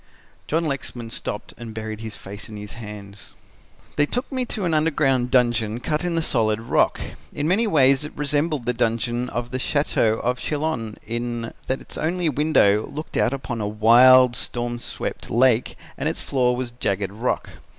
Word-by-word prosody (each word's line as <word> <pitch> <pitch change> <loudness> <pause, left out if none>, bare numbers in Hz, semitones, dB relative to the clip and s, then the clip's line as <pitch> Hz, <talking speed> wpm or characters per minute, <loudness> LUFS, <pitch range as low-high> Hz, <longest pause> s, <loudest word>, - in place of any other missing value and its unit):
John 165 +2 +1
Lexman 125 -5 -4
stopped 105 -2 -5
and 115 -2 -8
buried 110 -1 -5
his 110 -1 -6
face 100 +1 -9
in 105 - -8
his 105 0 -7
hands. 105 -3 -10 0.6
"They 145 0 +4
took 245 - -3
me 260 -2 -1
to 210 -4 -2
an 170 - +1
underground 145 -5 +2
dungeon 120 -3 +2
cut 150 +6 -1
in 175 -1 -1
the 165 - +1
solid 110 -6 +1
rock. 115 - +2 0.3
In 145 +1 -1
many 210 +7 +3
ways 140 -6 +4
it 150 - -5
resembled 150 -2 0
the 125 - +1
dungeon 120 +1 0
of 120 0 -4
the 130 - -2
Chateau 130 -6 +1
of 125 +1 0
Chillon, 145 -8 -2
in 120 0 -3
that 130 - -1
its - - -8
only 170 +1 0
window 135 -8 +3
looked 155 +3 -7
out - - +3
upon 130 -4 -4
a 105 - -1
wild, 120 +4 +6
storm 120 0 -3
swept - - -5
lake 120 0 +3 0.2
and - - 0
its - - -4
floor 125 -2 +1
was 125 -1 -4
jagged 100 -5 -2
rock. 115 +5 -2
125 Hz, 180 wpm, -23 LUFS, 115-145 Hz, 0.6 s, wild